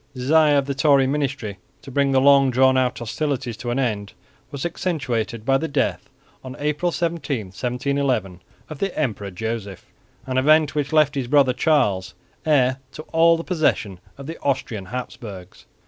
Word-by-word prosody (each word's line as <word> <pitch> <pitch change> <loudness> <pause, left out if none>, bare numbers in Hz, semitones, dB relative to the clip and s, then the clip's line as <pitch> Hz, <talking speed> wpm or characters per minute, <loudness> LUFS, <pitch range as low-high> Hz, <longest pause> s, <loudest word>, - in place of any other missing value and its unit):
The 125 - -6
desire 150 +2 +4
of 140 - +1
the 140 - -2
Tory 140 -1 +4
ministry 135 -7 -2 0.2
to 135 - -10
bring 140 +1 +1
the 135 - +4
long 140 0 +5
drawn 130 +1 +4
out 130 -1 +1
hostilities 130 0 -3
to 120 0 -5
an 120 - -1
end 105 -6 -2 0.4
was 140 0 -5
accentuated 130 -10 -2
by 135 +1 +3
the 160 - -2
death, 145 -2 -1 0.3
on 130 -1 -8
April 150 +4 -1
17, 165 - -2
1711, 125 -3 -2 0.3
of 155 -3 -9
the 195 -2 -2
Emperor 105 -9 -2
Joseph, 105 0 -5 0.4
an 130 0 0
event 155 +2 +4
which 145 0 -2
left 155 -2 +4
his 135 -3 -3
brother 135 -1 +4
Charles 125 - +1 0.3
heir 130 -4 +3 0.2
to 155 - -8
all 165 +1 +5
the 165 - -5
possessions 150 - 0 0.2
of 140 - -9
the 165 +3 -7
Austrian 120 -7 -2
Habsburgs. 100 -5 -8
135 Hz, 170 wpm, -22 LUFS, 120-150 Hz, 0.4 s, long